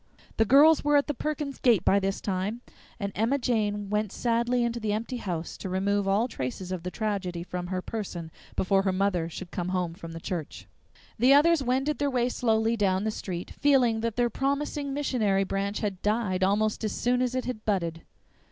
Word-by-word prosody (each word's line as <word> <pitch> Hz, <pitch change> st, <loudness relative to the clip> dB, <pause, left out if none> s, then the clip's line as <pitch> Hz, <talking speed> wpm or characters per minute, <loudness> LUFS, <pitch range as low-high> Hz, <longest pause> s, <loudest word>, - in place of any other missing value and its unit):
The 225 Hz, -, +4 dB
girls 290 Hz, +7 st, +6 dB
were 295 Hz, 0 st, +4 dB
at 285 Hz, -, +3 dB
the 295 Hz, -, -2 dB
Perkins's 295 Hz, 0 st, -3 dB
gate 235 Hz, -7 st, +3 dB
by 200 Hz, -, +5 dB
this 195 Hz, 0 st, -2 dB
time, 200 Hz, +4 st, -2 dB, 0.4 s
and 200 Hz, -2 st, -2 dB
Emma 230 Hz, +6 st, +1 dB
Jane 210 Hz, -5 st, 0 dB
went 210 Hz, -1 st, 0 dB
sadly 240 Hz, +1 st, +1 dB
into 235 Hz, 0 st, -1 dB
the 215 Hz, -2 st, -1 dB
empty 230 Hz, +4 st, -3 dB
house 175 Hz, -7 st, -4 dB
to 190 Hz, -, -6 dB
remove 195 Hz, +2 st, 0 dB
all 205 Hz, +5 st, +2 dB
traces 180 Hz, -, -5 dB
of 185 Hz, -2 st, -3 dB
the 180 Hz, -, -4 dB
tragedy 190 Hz, -5 st, -3 dB
from 180 Hz, 0 st, -5 dB
her 185 Hz, 0 st, -3 dB
person 175 Hz, -7 st, -5 dB, 0.2 s
before 195 Hz, +1 st, +2 dB
her 195 Hz, -1 st, +1 dB
mother 185 Hz, -3 st, 0 dB
should 175 Hz, +1 st, -8 dB
come 175 Hz, 0 st, -3 dB
home 180 Hz, -2 st, -1 dB
from 165 Hz, -2 st, -9 dB
the 165 Hz, -, -6 dB
church. 165 Hz, -2 st, -5 dB, 0.5 s
The 260 Hz, +4 st, +6 dB
others 325 Hz, +2 st, +5 dB
wended 270 Hz, +3 st, 0 dB
their 285 Hz, -1 st, +1 dB
way 250 Hz, -2 st, +1 dB
slowly 225 Hz, -2 st, +1 dB
down 195 Hz, -3 st, +1 dB
the 220 Hz, -, 0 dB
street, 180 Hz, -4 st, -5 dB
feeling 255 Hz, -6 st, +3 dB
that 230 Hz, -1 st, -2 dB
their 240 Hz, -1 st, +1 dB
promising 280 Hz, +2 st, -1 dB
missionary 230 Hz, -9 st, +1 dB
branch 195 Hz, +1 st, -2 dB
had 200 Hz, -4 st, -3 dB
died 210 Hz, -3 st, 0 dB
almost 210 Hz, +3 st, +1 dB
as 215 Hz, -, -1 dB
soon 245 Hz, +1 st, +1 dB
as 255 Hz, 0 st, 0 dB
it 255 Hz, -, -1 dB
had 240 Hz, -4 st, -5 dB
budded. 170 Hz, -5 st, -1 dB
210 Hz, 200 wpm, -27 LUFS, 190-245 Hz, 0.5 s, girls